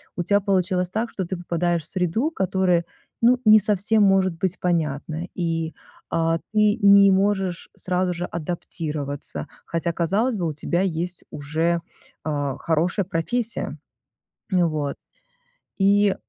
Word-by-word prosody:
у 175 Hz, -, -2 dB
тебя 200 Hz, +3 st, +3 dB
получилось 185 Hz, -2 st, +1 dB
так, 225 Hz, +4 st, -2 dB
что 190 Hz, -, -4 dB
ты 180 Hz, +1 st, -4 dB
попадаешь 175 Hz, -1 st, -1 dB
в -, -, -8 dB
среду, 190 Hz, -, 0 dB
которая, 185 Hz, -, +1 dB, 0.4 s
ну 245 Hz, +2 st, +5 dB
не 215 Hz, 0 st, +8 dB
совсем 210 Hz, +1 st, +2 dB
может 190 Hz, -2 st, +3 dB
быть 185 Hz, 0 st, -2 dB
понятная. 160 Hz, 0 st, -1 dB
И, 165 Hz, -2 st, -2 dB, 0.4 s
а, 165 Hz, 0 st, +1 dB
ты 210 Hz, +1 st, +3 dB
не 200 Hz, -1 st, +7 dB
можешь 190 Hz, -2 st, 0 dB
сразу 180 Hz, 0 st, -1 dB
же 175 Hz, +1 st, -3 dB
адаптироваться, 155 Hz, -4 st, -4 dB, 0.2 s
хотя 170 Hz, +1 st, -1 dB
казалось 200 Hz, +10 st, +1 dB
бы, 175 Hz, -, -1 dB
у 155 Hz, -, -2 dB
тебя 175 Hz, +4 st, -1 dB
есть 175 Hz, -1 st, -2 dB
уже, 160 Hz, +4 st, -1 dB, 0.4 s
а, 145 Hz, -3 st, -2 dB
хорошая 170 Hz, +5 st, 0 dB
профессия. 230 Hz, +7 st, -1 dB, 0.7 s
Ну 180 Hz, -3 st, +3 dB
вот. 150 Hz, -2 st, -2 dB, 0.8 s
И, 200 Hz, 0 st, +4 dB
180 Hz, 135 wpm, -23 LUFS, 165-200 Hz, 0.8 s, не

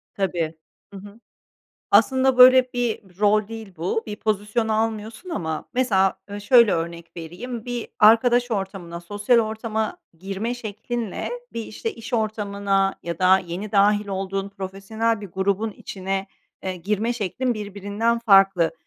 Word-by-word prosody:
Tabii. 175 Hz, -5 st, -1 dB, 0.4 s
Hı -, -, -8 dB
hı. 205 Hz, +3 st, -13 dB, 0.7 s
Aslında 260 Hz, +5 st, +4 dB
böyle 255 Hz, 0 st, +8 dB
bir 220 Hz, -6 st, -3 dB
rol 210 Hz, 0 st, +3 dB
değil 225 Hz, -3 st, -8 dB
bu. 180 Hz, +7 st, -1 dB
Bir 210 Hz, -, -5 dB
pozisyon 215 Hz, +2 st, -1 dB
almıyorsun 220 Hz, -, -2 dB
ama 160 Hz, -, -3 dB
mesela 195 Hz, -7 st, +2 dB
ö 205 Hz, 0 st, -7 dB
şöyle 235 Hz, -1 st, +6 dB
örnek 170 Hz, 0 st, -4 dB
vereyim: 215 Hz, +9 st, -7 dB
Bir 245 Hz, -2 st, -4 dB
arkadaş 240 Hz, +3 st, +5 dB
ortamına, 190 Hz, -5 st, -4 dB
sosyal 205 Hz, +7 st, +1 dB
ortama 220 Hz, 0 st, -2 dB, 0.2 s
girme 195 Hz, +6 st, -3 dB
şeklinle, 225 Hz, -1 st, -5 dB, 0.2 s
bir 230 Hz, -, -4 dB
işte 220 Hz, +1 st, -5 dB
iş 230 Hz, +2 st, -10 dB
ortamına 200 Hz, -3 st, 0 dB
ya 170 Hz, -1 st, -5 dB
da 185 Hz, +1 st, +5 dB
yeni 185 Hz, +3 st, -6 dB
dâhil 205 Hz, 0 st, +3 dB
olduğun 195 Hz, 0 st, -3 dB
profesyonel 200 Hz, +3 st, -3 dB
bir 205 Hz, -, -7 dB
grubun 200 Hz, +4 st, 0 dB
içine, 195 Hz, 0 st, -4 dB, 0.4 s
eee, 185 Hz, -1 st, -3 dB
girme 210 Hz, +6 st, -1 dB
şeklin 235 Hz, +3 st, -2 dB
birbirinden 205 Hz, +3 st, -2 dB
farklı. 195 Hz, -6 st, +4 dB
205 Hz, 135 wpm, -23 LUFS, 195-225 Hz, 0.7 s, böyle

